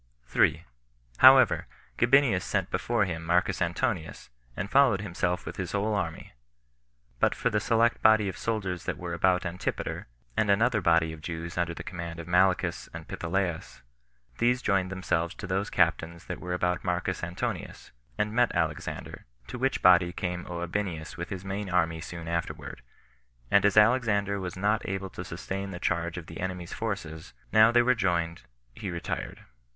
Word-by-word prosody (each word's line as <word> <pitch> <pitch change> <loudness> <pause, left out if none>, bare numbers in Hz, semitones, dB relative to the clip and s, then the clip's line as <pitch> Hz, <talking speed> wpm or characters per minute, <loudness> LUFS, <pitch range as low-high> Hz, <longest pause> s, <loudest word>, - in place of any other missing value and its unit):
3. - - +2 0.5
However, - - +7 0.3
Gabinius 120 -6 +4
sent 95 -3 -1
before 115 -3 +1
him 85 -3 -4
Marcus 90 +3 +1
Antonius, 85 - -2 0.3
and 100 +2 -4
followed 130 -8 +4
himself 90 -2 -2
with - - -7
his 90 -1 -4
whole 105 +2 0
army; 85 -5 -3 0.9
but - - +2
for - - 0
the 105 - +2
select 115 +2 +2
body 110 -2 +5
of 95 - -4
soldiers 95 -6 -3
that - - -2
were 85 -1 -5
about 90 +2 +2
Antipater, 90 +1 -4 0.3
and 105 - +1
another 110 +2 +3
body 85 -2 +3
of 80 - -11
Jews 85 +2 -5
under 85 -1 -1
the - - -7
command 85 -2 -6
of 85 - -8
Malichus 90 +1 +2
and - - -8
Pitholaus, 85 -7 -3 0.6
these 125 +1 +2
joined 95 -2 +1
themselves 85 -2 -1
to - - -7
those 95 +2 -1
captains 85 0 0
that - - -5
were 90 0 -3
about 90 0 -1
Marcus 90 0 -2
Antonius, 85 +1 -5 0.3
and 105 0 -1
met 120 +1 +3
Alexander; 80 -3 -3 0.2
to 125 - -7
which 135 +1 0
body 90 -1 +6
came 90 0 -4
Gabinius 85 -1 -4
with 85 +1 -6
his 95 -1 -6
main 95 +1 -4
army 85 -2 +1
soon 85 -1 -7
afterward; 85 -6 -4 0.7
and 100 - +5
as 105 0 +3
Alexander 105 -3 +3
was 90 -1 -5
not 105 +3 +1
able 95 0 -4
to 90 - -7
sustain 95 +3 -5
the 95 - -6
charge 85 -1 -1
of 90 - -6
the 80 0 -10
enemies' 90 -1 -4
forces, 95 -8 -5 0.2
now 110 +1 +7
they 120 0 +5
were 125 +1 +4
joined, 85 - -1 0.3
he 95 - -6
retired. 85 -1 -5
90 Hz, 165 wpm, -28 LUFS, 85-105 Hz, 0.9 s, However